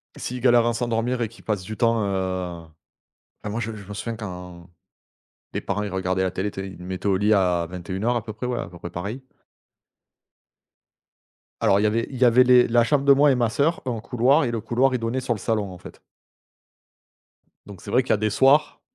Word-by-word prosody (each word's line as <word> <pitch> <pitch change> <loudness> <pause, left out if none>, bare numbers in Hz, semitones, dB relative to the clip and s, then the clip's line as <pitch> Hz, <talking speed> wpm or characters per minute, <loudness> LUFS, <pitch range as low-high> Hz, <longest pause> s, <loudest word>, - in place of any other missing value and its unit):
S'ils 125 0 -5
galèrent 120 -2 +4
à 120 - +1
s'endormir 120 +1 -1
et 115 - 0
qu'ils 115 - -18
passent 105 -4 -2
du 110 +4 -6
temps, 115 -1 +2
heu, 95 -3 -3 0.8
enfin, 105 - -4
moi 110 +3 -3
je 115 0 -3
me 110 - -8
je 100 -2 -12
me 105 - -7
souviens 115 +3 -4
quand, 90 -4 -9 0.8
mes - - -2
parents 100 +1 -2
ils 105 - -4
regardaient 95 0 -1
la 95 - +1
télé, 100 +3 -3
tu 95 - -6
sais, 95 - -6
ils 95 - -11
me 90 - -9
mettaient 95 +2 -4
au 95 -1 +3
lit 105 +2 +3
à 90 -4 +2
21:00 95 +6 -2
à 120 - -1
peu 110 - -7
près 110 +4 -6
ouais, 125 -1 -2
à - - -4
peu 85 - -12
près 85 0 -8
pareil 105 +10 -6 2.4
alors 100 - +3
il - - +1
y - - +3
avait 115 +2 0
il 130 - -7
y 125 - +4
avait 125 +1 +6
les 125 -1 +5
la 120 0 +4
chambre 140 +3 +1
de 140 - +8
moi 145 +1 +5
et - - +2
ma 120 -2 +1
sœur, 145 +9 0
un 120 -3 -2
couloir 125 +7 +2
et 120 - -2
le 115 - -2
couloir 130 +5 +1
il 125 - 0
donnait 115 +3 -2
sur 120 - -1
le 110 - -7
salon 105 -2 -1
en 90 - -10
fait - - -13 1.7
donc 100 -3 -12
c'est 100 - -8
vrai 130 +4 +3
qu'il - - -3
y - - +6
a - - +2
des 110 +1 0
soirs, 135 +7 +3
110 Hz, 240 wpm, -23 LUFS, 95-125 Hz, 2.4 s, de